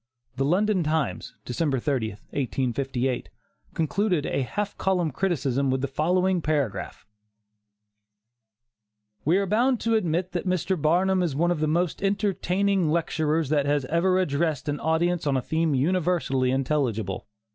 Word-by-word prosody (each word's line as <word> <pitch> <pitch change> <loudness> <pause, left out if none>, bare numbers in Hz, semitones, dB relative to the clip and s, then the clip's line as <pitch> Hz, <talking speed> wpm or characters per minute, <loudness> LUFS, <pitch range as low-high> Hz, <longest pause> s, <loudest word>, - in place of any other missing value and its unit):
The 135 - 0
London 190 +5 +2
Times, 155 -1 -2
December 135 +2 0
30, 120 -4 -1 0.2
1858, 130 -1 -1 0.5
concluded 175 0 0
a - - -1
half 205 +10 -3
column 180 -4 0
criticism 140 -5 0
with 130 0 0
the 140 - 0
following 180 +6 +1
paragraph: 145 -8 -2 2.2
"We 165 +6 +4
are 200 - +1
bound 240 +5 +2
to 230 - +1
admit 180 -4 0
that 180 +1 -3
Mr. 185 +1 0
Barnum 180 +4 +2
is 165 -6 -1
one 170 +4 +2
of 175 - -1
the 155 - +1
most 170 +2 0
entertaining 195 -2 +1
lecturers 160 -2 0
that 145 -2 +1
ever 165 +6 +1
addressed 155 -4 0
an 145 0 -1
audience 165 0 0
on 135 -2 +2
a - - +2
theme 160 -2 0
universally 155 -4 +1
intelligible. 125 -7 -1
160 Hz, 135 wpm, -25 LUFS, 140-185 Hz, 2.2 s, We